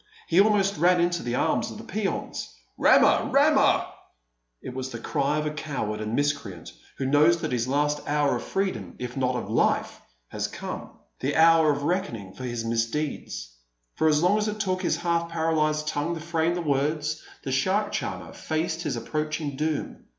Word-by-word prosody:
He 175 +3 +5
almost 200 -2 +2
ran 175 +3 +4
into 175 0 +1
the 120 0 -2
arms - - +1
of - - -8
the - - -9
peons. - - -3 0.2
"Rama! - - +5
Rama!" - - +4 0.7
It 130 - -8
was 130 0 -4
the 120 - -6
cry 140 +4 0
of 150 - -1
a 150 - -1
coward 135 -9 -3
and 110 +2 -2
miscreant 140 - -2 0.2
who 135 - -2
knows 155 +5 +4
that - - -2
his 120 -1 0
last 145 +2 +1
hour 145 -2 +2
of - - -6
freedom, 120 - -2
if 125 0 -6
not 130 -1 0
of 120 - -3
life, - - +1 0.3
has - - -2
come: - - -6 0.3
the 140 +3 -1
hour 160 -1 +6
of 145 0 -2
reckoning 145 - -2
for 130 - -7
his 120 -2 -3
misdeeds. 115 - -2 0.4
For 160 - +1
as 150 +1 +3
long 200 +4 +4
as 210 - 0
it 210 0 -3
took 185 -3 0
his 185 - +1
half 170 -1 0
paralysed 155 -2 0
tongue 155 +3 -1
to - - -5
frame 165 +1 0
the 175 - -2
words, 150 +1 0 0.2
the 135 - -3
shark 190 +11 +1
charmer - - -4
faced 160 +1 -2
his 140 - -2
approaching 155 +3 -3
doom. 155 +1 -3
150 Hz, 185 wpm, -26 LUFS, 130-170 Hz, 0.7 s, hour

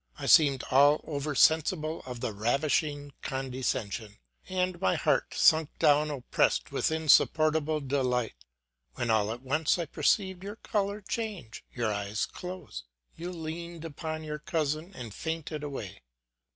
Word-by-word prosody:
I - - -6
seemed 140 -4 +5
all 145 +3 +6
over 145 -1 -3
sen 160 +4 +6
sible 155 -1 -3
of 125 -2 -6
the 110 - -2
ravishing 145 +5 0
condescension, 125 -6 -3 0.3
and 185 -1 -1
my 95 - +2
heart - - +1
sunk 160 -1 +5
down 150 -1 +4
oppressed 140 -4 0
with - - 0
insupportable 155 0 +3
delight: 130 - 0 0.6
when 120 -2 -1
all 110 -1 +2
at 120 +3 -7
once 150 +6 +1
I 170 - -2
perceived 190 +3 0
your 205 +2 -6
color 205 -1 -2
change, 200 - -5
your 115 -4 -1
eyes 100 +1 -2
close; 180 - -8 0.3
you 175 +2 -6
leaned 165 0 -6
upon 155 0 -5
your 150 -1 -5
cousin 155 0 -2
and 120 -7 -7
fainted 160 0 -4
away. 135 -10 -6
150 Hz, 140 wpm, -29 LUFS, 130-165 Hz, 0.6 s, all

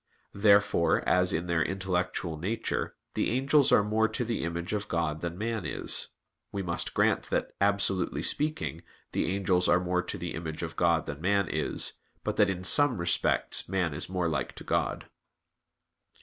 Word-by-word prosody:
Therefore, 100 0 +3
as 90 0 +3
in 85 +2 -1
their 85 -2 0
intellectual 95 -3 -2
nature, 95 +9 -3 0.2
the - - 0
angels 135 +3 +3
are 105 - +5
more 110 +2 +2
to 110 +3 -2
the 115 -5 -2
image 85 +3 -3
of 105 0 -2
God 80 -2 -1
than 85 0 -4
man 110 +1 -2
is, - - +1 0.4
we 100 -1 -3
must 85 -2 -3
grant - - +2
that, - - -1
absolutely 100 -2 +1
speaking, 150 - -1 0.3
the - - -1
angels 95 -2 +1
are 90 - +5
more 90 0 0
to 90 +3 -5
the 85 -1 -5
image 80 0 -5
of 80 - -5
God 85 -2 +2
than 75 +1 -6
man 100 +1 +2
is, - - -1 0.2
but - - -2
that 105 - +4
in 90 -1 -3
some 145 +5 +5
respects 85 0 +1
man 90 -5 0
is 75 +5 -4
more 90 -2 -1
like 75 -6 -2
to - - -9
God. - - -1
90 Hz, 175 wpm, -28 LUFS, 85-105 Hz, 0.4 s, are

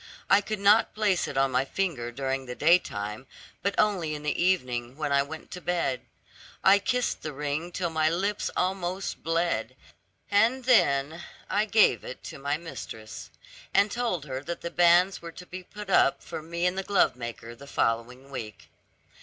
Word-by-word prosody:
I 195 +1 +7
could 215 +1 -3
not 205 +3 +4
place 205 -4 +1
it 135 - -5
on 135 0 +3
my 130 +1 +2
finger 135 -7 -2
during 135 +1 -3
the 125 - -5
daytime, 130 - +1 0.3
but 200 - 0
only 185 -8 +1
in 150 - -8
the 150 - -1
evening, 125 -9 0
when 150 -2 -2
I 140 0 +4
went 155 +3 -8
to 180 - -7
bed. 165 -6 -1 0.6
I 195 +1 +7
kissed 250 +4 -1
the 155 - -5
ring 150 +4 -3
till 175 -2 -2
my 155 -1 +2
lips 200 +5 -1
almost 185 0 -2
bled, 165 +1 -1 0.6
and 230 +6 +3
then 160 - +3 0.3
I 210 +1 +2
gave 210 - +4
it 130 - -8
to - - -8
my 140 +2 -1
mistress, 110 -9 -8 0.5
and 205 +1 +4
told 230 - -1
her 130 -2 -4
that 170 +4 -5
the 170 - -5
banns 175 +2 +4
were 170 -1 -8
to 180 - -10
be 185 +1 -8
put 205 +2 -9
up 135 - +4
for - - -6
me 170 +2 -3
and 180 +1 +1
the - - -2
glovemaker 120 - 0
the 140 +4 -13
following 125 +2 -1
week. 110 -6 -7
165 Hz, 180 wpm, -27 LUFS, 135-190 Hz, 0.6 s, I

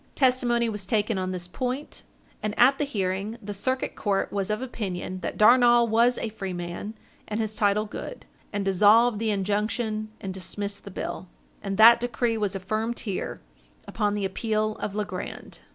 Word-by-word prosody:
Testimony 245 -3 +2
was 210 -4 -4
taken 210 0 +1
on 185 0 -2
this 180 -1 -5
point, 255 +9 -4 0.4
and 210 0 -3
at 270 +3 +5
the 295 - +1
hearing, 200 -2 -2
the 205 0 -6
Circuit 260 +6 -2
Court 200 -2 -1
was 200 -1 -1
of 215 0 0
opinion 190 -7 -4
that 170 - -4
Darnall 240 +1 +6
was 235 +2 +3
a 230 - -3
free 195 -3 -5
man 175 +5 -5 0.3
and 215 +1 -3
his 215 -1 -2
title 210 0 +2
good, 360 - -8 0.3
and 200 -1 -2
dissolved 210 +4 +5
the 225 0 0
injunction 215 +2 -1
and 190 -1 -5
dismissed 200 +2 -5
the - - -7
bill; 185 0 -5 0.3
and 195 -1 -3
that 230 +2 +9
decree 240 -1 0
was 205 -3 -1
affirmed 215 +5 -2
here, 200 -5 -4 0.5
upon 210 -2 0
the 205 -1 -1
appeal 215 +2 -1
of 205 - -4
Legrand. 210 -1 -5
215 Hz, 170 wpm, -26 LUFS, 195-235 Hz, 0.5 s, that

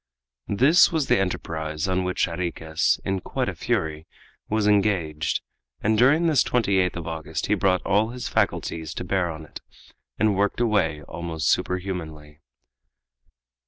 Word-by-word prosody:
This 135 - +5
was 160 -4 0
the - - +4
enterprise 80 -4 -3
on 95 0 0
which 90 0 0
Jarriquez, 85 -2 -1
in 95 0 0
quite - - -3
a - - -2
fury, 80 +1 -2 0.4
was 110 -1 +1
engaged, 95 -7 +1 0.4
and 110 +1 +1
during 140 +9 +4
this 155 -5 +4
28th 95 -6 +1
of 85 -2 -5
August 80 -1 -4
he - - +1
brought 95 -2 +1
all 105 +3 +2
his 125 +1 -5
faculties 80 -2 -1
to - - -4
bear 95 -3 0
on 80 -1 -7
it, - - -11 0.6
and 105 -2 +2
worked 100 +3 0
away 95 -10 +1
almost 80 -1 -3
superhumanly. 80 -5 -3
90 Hz, 145 wpm, -24 LUFS, 80-105 Hz, 0.6 s, This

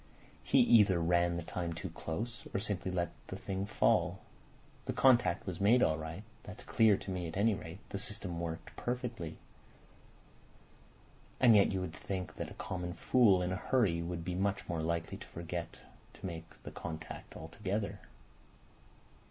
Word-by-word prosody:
He - - +4
either 105 - +6
ran 85 +1 +2
the 85 - -3
time 85 0 -3
too 85 +2 -6
close, 110 +9 -5
or - - +2
simply 100 -2 -2
let 85 -2 -1 0.2
the - - -5
thing 95 0 -3
fall. 105 - +2 0.7
The - - -2
contact 125 -9 +4
was 90 -1 -4
made 115 +5 +6
all 80 0 +2
right—that's 105 +7 -9
clear 110 -3 +4
to 95 - -6
me 90 -2 -2
at 80 - -6
any 110 +2 +4
rate. 80 -2 -6
The 100 - -4
system's 100 -4 -4
worked 80 -1 -5
perfectly. 120 -9 -3 2.0
And 120 -3 +7
yet 100 - +6
you 95 -1 -1
would 85 -3 -4
think 95 +1 -4
that - - -4
a - - -11
common 90 -2 -4
fool 105 -8 +4
in 90 - -1
a - - 0
hurry 100 -7 +2
would 85 0 -4
be 90 - -2
much 100 +2 -1
more 85 -2 -1
likely 85 +1 -2
to - - -10
forget 85 0 -5 0.3
to - - -10
make 85 -2 -7
the - - -7
contact 80 -1 -7
altogether. 100 +5 -3
90 Hz, 165 wpm, -33 LUFS, 85-105 Hz, 2.0 s, And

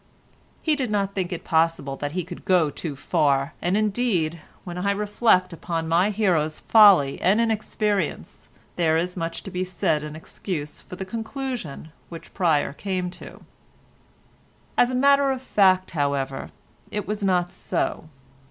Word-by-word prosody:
He 310 -2 +2
did 260 -5 -2
not 200 -2 0
think 185 -2 -2
it 175 - -5
possible 160 -4 +1
that 145 +1 -4
he 180 0 -1
could 175 0 -9
go 175 -5 +3
too 150 -2 -5
far, 140 -1 +1
and 180 +3 +1
indeed, 200 -7 0 0.2
when 175 -1 -6
I 200 +2 0
reflect 200 -2 +2
upon 165 0 -3
my 170 +5 +3
hero's 175 -8 +1
folly 195 -11 +6
and 200 +4 +3
inexperience, 215 -5 -1 0.3
there 160 -2 +3
is 180 +2 -2
much 165 -2 -4
to 195 - -8
be 180 +1 -2
said 175 -4 0
in 150 0 -7
excuse 155 -1 -6
for - - -10
the 190 +1 -5
conclusion 225 - -5 0.2
which 165 -1 -10
Pryer 160 -7 +1
came 185 +1 -3
to. - - -12 1.3
As 245 - +4
a 255 - -2
matter 280 +1 +4
of 265 -1 -1
fact, 190 -6 +3
however, 140 -3 -2 0.4
it 210 -1 -4
was 210 0 -3
not 180 -2 +1
so. 155 - -3
180 Hz, 155 wpm, -24 LUFS, 160-210 Hz, 1.3 s, folly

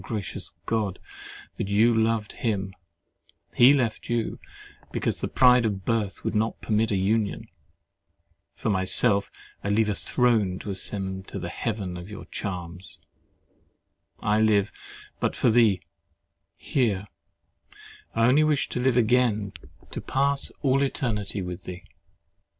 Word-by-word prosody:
gracious 105 -5 -4
God! 105 -5 -1 0.6
that - - -2
you 110 +4 +4
loved 110 -1 +1
him) 95 -5 -2 0.8
he 125 +3 +7
left 125 -6 0
you 120 -1 -1 0.5
because - - -1
"the - - -1
pride 125 -1 +5
of 100 -4 -2
birth 110 -4 -1
would - - -1
not 110 +1 0
permit 110 0 +1
a 105 - +1
union."—For 105 +2 -4
myself, 100 +2 +2 0.3
I - - -3
would 100 +1 +1
leave 110 -1 +3
a - - +1
throne 110 -3 +1
to 100 - -6
ascend 95 -1 -2
to - - -6
the 85 -2 -4
heaven 100 -4 -3
of 90 +1 -8
thy 105 - -8
charms. 90 -2 -5 1.2
I 105 +1 +2
live 105 -2 +3 0.5
but - - 0
for 120 - +3
thee, 110 -6 +4 0.8
here—I 110 0 -4
only 135 +5 +5
wish 150 -2 +1
to - - -3
live 125 0 +2
again 110 -4 +2 0.4
to - - -4
pass 140 +1 0
all 135 0 +3
eternity 105 -7 -1
with 90 +1 -7
thee. 90 0 -7
105 Hz, 135 wpm, -26 LUFS, 95-120 Hz, 1.2 s, he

